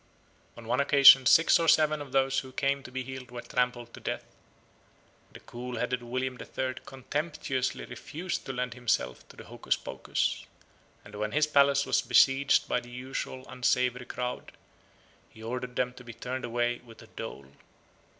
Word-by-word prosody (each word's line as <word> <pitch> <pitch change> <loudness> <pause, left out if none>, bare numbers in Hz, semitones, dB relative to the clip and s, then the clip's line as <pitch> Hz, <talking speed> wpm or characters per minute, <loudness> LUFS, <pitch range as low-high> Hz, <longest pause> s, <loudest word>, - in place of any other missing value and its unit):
On 115 -1 -11
one 125 +3 +1
occasion 140 -2 +8
six 160 +6 +6
or 165 - 0
seven 155 -1 +4
of 140 -2 -9
those 135 0 +2
who 130 -1 -9
came 140 +1 0
to 130 - -11
be 130 0 -4
healed 130 -1 -8
were 120 -1 -8
trampled 125 -1 -2
to - - -10
death. - - -4 1.1
The - - -12
cool 125 0 -7
headed 125 +1 -1
William 130 +1 -3
the - - -9
Third 130 -1 -4
contemptuously 135 -1 -3
refused 175 +4 -6
to - - -2
lend 125 -1 -3
himself 115 - -2
to - - -15
the - - -10
hocuspocus; - - -2 0.6
and 105 - -14
when 105 +1 -3
his 155 0 +3
palace 140 -2 +4
was - - +2
besieged 135 +1 +4
by - - +1
the 120 0 -13
usual 130 +1 -6
unsavoury 125 0 0
crowd, 125 0 -5 0.8
he 110 - -14
ordered 125 +2 -5
them 125 0 0
to 125 - -13
be 120 -1 -9
turned 130 +3 -5
away 120 0 -1
with 115 -2 -15
a - - -16
dole. 70 0 -8
125 Hz, 170 wpm, -29 LUFS, 120-135 Hz, 1.1 s, occasion